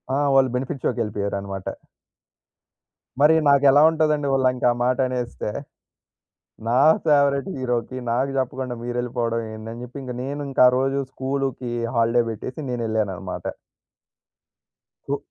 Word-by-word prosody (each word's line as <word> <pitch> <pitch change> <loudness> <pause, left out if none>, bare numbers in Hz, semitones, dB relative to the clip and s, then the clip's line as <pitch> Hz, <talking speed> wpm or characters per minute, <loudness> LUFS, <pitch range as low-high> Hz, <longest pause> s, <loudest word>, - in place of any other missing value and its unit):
ఆ! - - +1 0.2
వాళ్ళు 135 -1 +5
బెనిఫిట్ 135 +2 -3
షోకెళ్ళిపోయారనమాట. 100 -3 -3 1.4
మరీ 155 +2 +6
నాకెలా 140 0 +6
ఉంటదండి, 155 -3 +1
వాళ్ళింక 130 -2 +1
ఆ - - +1
మాటనేస్తే? 125 -3 -1 1.2
నా 125 +3 +3 0.3
ఫేవరెట్ 140 -1 +3
హీరోకి, 125 -1 -2
నాకు 130 +3 0
జెప్పకుండా 130 -1 -2
మీరెళ్ళిపోవడమేందని 115 -2 -3
జెప్పి, 125 +3 -8
ఇంగ 125 - -5
నేనింక 140 0 -2
ఆ - - +7
రోజు 135 +1 0
స్కూలూకి 135 -2 -3 0.2
హాలిడే 115 +1 +3
బెట్టేసి 130 +6 -6
నేనెళ్ళాననమాట. 110 -6 -3 1.7
ఉ - - 0
125 Hz, 100 wpm, -23 LUFS, 115-135 Hz, 1.7 s, ఆ